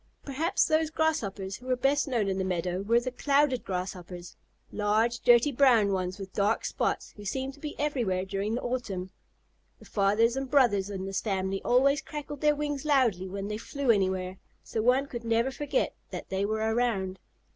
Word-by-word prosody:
Perhaps 315 Hz, +7 st, +1 dB
those 315 Hz, 0 st, +2 dB
Grasshoppers 215 Hz, -13 st, -1 dB
who 255 Hz, -, -14 dB
were 255 Hz, -, +2 dB
best 275 Hz, +4 st, +1 dB
known 235 Hz, -6 st, 0 dB
in 190 Hz, 0 st, -1 dB
the -, -, 0 dB
meadow 180 Hz, 0 st, -1 dB
were 230 Hz, +4 st, +3 dB
the 255 Hz, +1 st, -4 dB
Clouded 275 Hz, 0 st, +2 dB
Grasshoppers, 180 Hz, -1 st, -6 dB, 0.4 s
large 220 Hz, +3 st, +1 dB
dirty 240 Hz, +5 st, +5 dB
brown 240 Hz, -6 st, +4 dB
ones 185 Hz, 0 st, -2 dB
with 195 Hz, -1 st, -8 dB
dark 205 Hz, +2 st, +1 dB
spots, -, -, -2 dB
who 205 Hz, -, -9 dB
seemed 265 Hz, +6 st, -3 dB
to 285 Hz, -, -17 dB
be 295 Hz, 0 st, -6 dB
everywhere 235 Hz, -11 st, 0 dB
during 200 Hz, +3 st, -2 dB
the 245 Hz, -, -4 dB
autumn. 200 Hz, -7 st, -3 dB, 0.7 s
The -, -, -17 dB
fathers 210 Hz, +4 st, +2 dB
and 270 Hz, -1 st, -3 dB
brothers 230 Hz, -8 st, +3 dB
in 190 Hz, -2 st, -4 dB
this 195 Hz, 0 st, -2 dB
family 195 Hz, -2 st, -2 dB
always 275 Hz, +4 st, +3 dB
crackled 295 Hz, -2 st, -7 dB
their 300 Hz, -1 st, +4 dB
wings 290 Hz, -2 st, -3 dB
loudly 245 Hz, -, +2 dB
when 195 Hz, +1 st, -4 dB
they 210 Hz, 0 st, -3 dB
flew 265 Hz, +3 st, 0 dB
anywhere, 190 Hz, -2 st, 0 dB, 0.3 s
so 220 Hz, -, -3 dB
one 250 Hz, +4 st, +3 dB
could 240 Hz, -4 st, -7 dB
never 230 Hz, +3 st, +1 dB
forget 295 Hz, -, -1 dB, 0.2 s
that -, -, -7 dB
they 190 Hz, +1 st, 0 dB
were 220 Hz, +1 st, 0 dB
around. 195 Hz, -6 st, 0 dB
230 Hz, 185 wpm, -28 LUFS, 195-270 Hz, 0.7 s, dirty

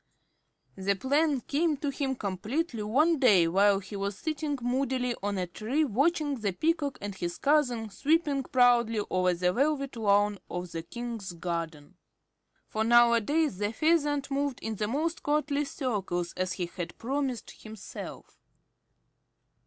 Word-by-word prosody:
The 195 Hz, +1 st, +1 dB
plan 280 Hz, +4 st, +1 dB
came 300 Hz, +4 st, 0 dB
to 285 Hz, 0 st, -2 dB
him 270 Hz, -1 st, -2 dB
completely 225 Hz, -, -3 dB
one 295 Hz, +10 st, +2 dB
day 200 Hz, -10 st, +5 dB
while 195 Hz, +3 st, +4 dB
he 195 Hz, +1 st, -8 dB
was 200 Hz, 0 st, -3 dB
sitting 305 Hz, -2 st, -2 dB
moodily 250 Hz, 0 st, 0 dB
on 200 Hz, 0 st, -2 dB
a 185 Hz, -, -1 dB
tree 225 Hz, -, -1 dB
watching 290 Hz, +3 st, +1 dB
the 205 Hz, -3 st, -1 dB
Peacock 305 Hz, -, 0 dB
and 205 Hz, 0 st, -5 dB
his 175 Hz, -2 st, -4 dB
cousin 250 Hz, -7 st, +1 dB
sweeping 290 Hz, -, +1 dB
proudly 240 Hz, -4 st, +3 dB
over 185 Hz, -1 st, +2 dB
the 180 Hz, +1 st, +1 dB
velvet 275 Hz, +2 st, 0 dB
lawn 205 Hz, -2 st, +2 dB
of 180 Hz, 0 st, -5 dB
the 165 Hz, -, -4 dB
King's 225 Hz, +1 st, -6 dB
garden. 165 Hz, -1 st, -5 dB, 0.7 s
For 220 Hz, -, -1 dB
nowadays 240 Hz, -, +4 dB
the 205 Hz, 0 st, 0 dB
Pheasant 290 Hz, 0 st, +1 dB
moved 280 Hz, -1 st, -1 dB
in 220 Hz, -1 st, -4 dB
the 210 Hz, -, -1 dB
most 315 Hz, +8 st, -1 dB
courtly 295 Hz, 0 st, 0 dB
circles, 195 Hz, -, -2 dB
as 185 Hz, 0 st, -1 dB
he 180 Hz, -, -2 dB
had 175 Hz, 0 st, -7 dB
promised 265 Hz, 0 st, -3 dB
himself. 215 Hz, -2 st, -9 dB
240 Hz, 145 wpm, -29 LUFS, 200-285 Hz, 0.7 s, day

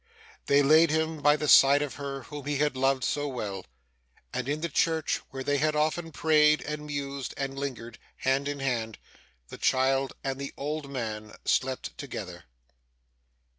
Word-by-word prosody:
They 140 Hz, 0 st, +5 dB
laid 155 Hz, +3 st, +6 dB
him 160 Hz, 0 st, -1 dB
by 150 Hz, +1 st, +5 dB
the 150 Hz, 0 st, -3 dB
side 140 Hz, +1 st, +7 dB
of 140 Hz, -4 st, -5 dB
her 140 Hz, -2 st, -5 dB
whom 145 Hz, -2 st, -8 dB
he 145 Hz, -1 st, 0 dB
had 150 Hz, -1 st, +1 dB
loved 135 Hz, 0 st, +1 dB
so 145 Hz, 0 st, -1 dB
well; 100 Hz, -, -5 dB, 0.7 s
and, 125 Hz, +1 st, -3 dB
in 150 Hz, +1 st, -1 dB
the 170 Hz, -, 0 dB
church 160 Hz, 0 st, +1 dB
where 135 Hz, -1 st, -6 dB
they 145 Hz, +1 st, +1 dB
had 155 Hz, +1 st, +1 dB
often 160 Hz, +2 st, 0 dB
prayed, 150 Hz, -1 st, +4 dB
and 150 Hz, 0 st, -5 dB
mused, 140 Hz, -2 st, -4 dB
and 135 Hz, -1 st, -3 dB
lingered 130 Hz, -4 st, -6 dB, 0.2 s
hand 135 Hz, +2 st, 0 dB
in 145 Hz, -1 st, -4 dB
hand, 115 Hz, -5 st, -2 dB, 0.5 s
the -, -, -10 dB
child 135 Hz, +1 st, +2 dB
and 135 Hz, 0 st, -3 dB
the 140 Hz, 0 st, -6 dB
old 150 Hz, 0 st, -4 dB
man 110 Hz, -5 st, -5 dB
slept 130 Hz, 0 st, 0 dB
together. 95 Hz, -, -7 dB
140 Hz, 170 wpm, -28 LUFS, 130-150 Hz, 0.7 s, side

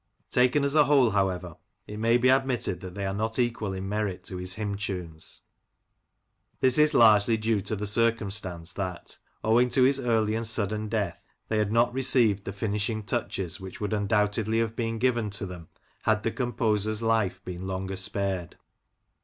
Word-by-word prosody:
Taken 125 Hz, +3 st, +3 dB
as 140 Hz, 0 st, +2 dB
a 150 Hz, -1 st, +5 dB
whole, 135 Hz, -5 st, +4 dB
however, 90 Hz, -4 st, -1 dB, 0.3 s
it 105 Hz, -, -8 dB
may 115 Hz, +2 st, +3 dB
be 125 Hz, +1 st, +3 dB
admitted 130 Hz, -8 st, +1 dB
that 95 Hz, -1 st, -8 dB
they 100 Hz, -1 st, -3 dB
are 95 Hz, -, -2 dB
not 110 Hz, +2 st, -2 dB
equal 120 Hz, -4 st, 0 dB
in 95 Hz, 0 st, -5 dB
merit 105 Hz, -2 st, -2 dB
to 95 Hz, -, -7 dB
his 90 Hz, +1 st, -2 dB
hymn 105 Hz, -2 st, -3 dB
tunes. 90 Hz, -5 st, -5 dB, 1.2 s
This 130 Hz, +2 st, +4 dB
is 150 Hz, -1 st, +5 dB
largely 110 Hz, 0 st, +6 dB
due 110 Hz, -1 st, 0 dB
to 100 Hz, +3 st, -3 dB
the 105 Hz, +1 st, -4 dB
circumstance 100 Hz, -6 st, 0 dB
that, 90 Hz, -3 st, -6 dB, 0.2 s
owing 115 Hz, +3 st, +3 dB
to 130 Hz, -, +3 dB
his 135 Hz, +1 st, +4 dB
early 110 Hz, -4 st, +1 dB
and 115 Hz, 0 st, -2 dB
sudden 110 Hz, -1 st, -2 dB
death, 100 Hz, -6 st, -2 dB, 0.3 s
they 110 Hz, -, +1 dB
had 105 Hz, -1 st, 0 dB
not 120 Hz, +1 st, +3 dB
received 125 Hz, -6 st, +2 dB
the -, -, -3 dB
finishing 105 Hz, +1 st, -2 dB
touches 100 Hz, -6 st, -3 dB
which 95 Hz, -1 st, -9 dB
would 105 Hz, 0 st, -2 dB
undoubtedly 105 Hz, +1 st, +1 dB
have 115 Hz, 0 st, 0 dB
been 115 Hz, -1 st, -2 dB
given 120 Hz, -2 st, +1 dB
to 100 Hz, 0 st, -5 dB
them 90 Hz, -3 st, -9 dB, 0.3 s
had 110 Hz, 0 st, +1 dB
the 115 Hz, -, 0 dB
composer's 110 Hz, -3 st, -1 dB
life 110 Hz, -5 st, +1 dB
been 90 Hz, +1 st, -6 dB
longer 95 Hz, 0 st, -3 dB
spared. 95 Hz, -2 st, -2 dB
105 Hz, 180 wpm, -27 LUFS, 95-115 Hz, 1.2 s, largely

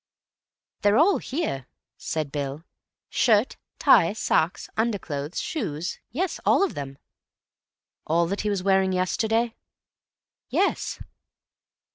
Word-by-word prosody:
"They're 205 Hz, +1 st, +4 dB
all 355 Hz, +8 st, +5 dB
here," 255 Hz, -, -3 dB, 0.3 s
said 155 Hz, -3 st, -3 dB
Bill. 145 Hz, +1 st, -4 dB, 0.4 s
"Shirt, 220 Hz, -1 st, +2 dB, 0.2 s
tie, 170 Hz, +3 st, +5 dB
socks, 175 Hz, -5 st, 0 dB
underclothes, 180 Hz, -10 st, -2 dB
shoes—yes, 310 Hz, -, -3 dB
all -, -, +4 dB
of 395 Hz, -, 0 dB
them." 135 Hz, -1 st, -6 dB, 1.1 s
"All 170 Hz, +2 st, +3 dB
that 195 Hz, +4 st, -2 dB
he 210 Hz, -, -1 dB
was 200 Hz, -3 st, -1 dB
wearing 190 Hz, -1 st, +3 dB
yesterday?" 225 Hz, +5 st, +1 dB, 1.0 s
"Yes." -, -, 0 dB
195 Hz, 100 wpm, -25 LUFS, 155-230 Hz, 1.1 s, all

